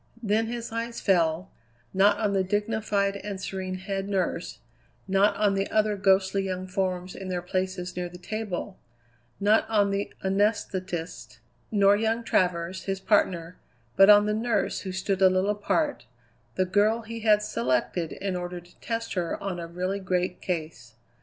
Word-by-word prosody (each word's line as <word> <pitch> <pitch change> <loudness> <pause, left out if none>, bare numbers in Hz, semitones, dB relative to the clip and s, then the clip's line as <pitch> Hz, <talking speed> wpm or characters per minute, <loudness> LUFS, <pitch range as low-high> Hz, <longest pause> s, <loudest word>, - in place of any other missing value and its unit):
Then 220 +1 +1
his 235 0 -5
eye 230 +1 -3
fell, 175 -4 +1 0.4
not 195 +2 +4
on 210 -3 0
the 195 -1 +2
dignified 205 0 0
and 200 -1 -6
serene 185 -1 -4
head 195 +1 -4
nurse, 185 -3 -2 0.5
not 200 +2 +3
on 205 -1 +3
the 195 0 -1
other 215 -1 +2
ghostly 195 0 +3
young 185 -1 -3
forms 185 -1 -2
in 190 - -7
their 180 -1 -3
places 185 0 -3
near 180 0 -3
the 175 - -11
table, 200 0 -5 0.6
not 210 +2 +3
on 205 -2 +3
the 200 +1 -2
anesthetist, 190 - -1 0.3
nor 200 -1 +5
young 225 +2 0
Travers, 180 -3 0
his 195 -1 -2
partner, 180 -4 +1 0.4
but 195 +1 +7
on 205 0 +8
the 210 - 0
nurse 230 +2 0
who 190 - -5
stood 190 +1 -2
a 190 - +8
little 185 +2 +2
apart, 250 - -1 0.5
the 185 - +2
girl 210 +5 +2
he 230 +1 -6
had 210 -1 +4
selected 130 - -1
in 195 -1 -3
order 180 0 -4
to 175 +1 -19
test 230 0 -3
her 175 -3 -1
on 190 -3 -4
a 170 - -5
really 185 +3 -3
great 180 -1 -1
case. 155 -10 -5
195 Hz, 165 wpm, -27 LUFS, 180-210 Hz, 0.6 s, on